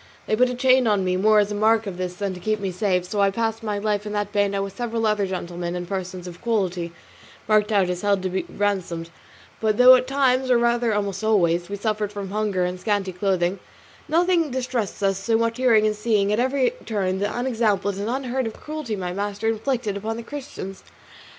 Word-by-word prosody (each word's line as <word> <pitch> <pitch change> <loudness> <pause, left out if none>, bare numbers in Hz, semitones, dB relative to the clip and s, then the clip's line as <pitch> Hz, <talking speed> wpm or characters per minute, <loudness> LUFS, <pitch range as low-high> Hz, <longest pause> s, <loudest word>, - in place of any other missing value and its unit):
They 215 - +1
put 250 +3 +3
a 250 - -3
chain 255 -1 +4
on 205 -3 +2
me, 185 0 +1
more 215 +3 +4
as 205 0 +3
a - - -1
mark 220 +2 +3
of 190 -3 -5
this 180 -1 -4
than 200 0 -3
to 180 - -8
keep 215 +3 -1
me 195 -2 -2
safe, 185 -1 0
and - - -11
so 200 +3 -1
I 200 - +4
passed 225 +2 -2
my 210 -2 -2
life 205 0 -1
in 210 0 -5
that 205 -1 -2
bano 200 -1 +1
with 195 0 -7
several 230 -1 -2
other 210 -2 +1
gentlemen 175 -1 -4
and 175 0 -4
persons 185 -1 -5
of 175 -1 -9
quality 185 -7 -1 0.6
marked 215 0 +3
out 200 -3 +3
as 180 0 -3
held 200 -2 +1
to 185 0 -1
ransom; 190 -5 -2 0.5
but 215 -1 +1
though 250 +1 +9
at 255 0 +3
times, 265 -1 +2
or 250 - +5
rather 235 0 +2
almost 200 -1 -2
always, 175 -5 +2
we 200 - -3
suffered 210 0 -2
from 200 -2 -6
hunger 205 -3 0
and 180 +1 -4
scanty 200 -1 -1
clothing, 185 0 0 0.5
nothing 335 0 +2
distressed 250 -6 -3
us 195 -1 +1
so 225 +3 +1
much 230 +1 -1
as - - -3
hearing 220 -3 +5
and 215 0 +1
seeing 210 -2 +1
at 215 - +1
every 260 - +2 0.2
turn 190 -4 -1
the 205 +1 -1
unexampled 220 -6 0
and 205 +3 -3
unheard 260 -1 -1
of 220 - -5
cruelties 300 -8 -5
my 180 -2 -3
master 205 +3 -2
inflicted 225 -2 -1
upon 220 +3 -3
the 235 - -6
Christians. 255 -8 -8
210 Hz, 220 wpm, -23 LUFS, 190-230 Hz, 0.6 s, though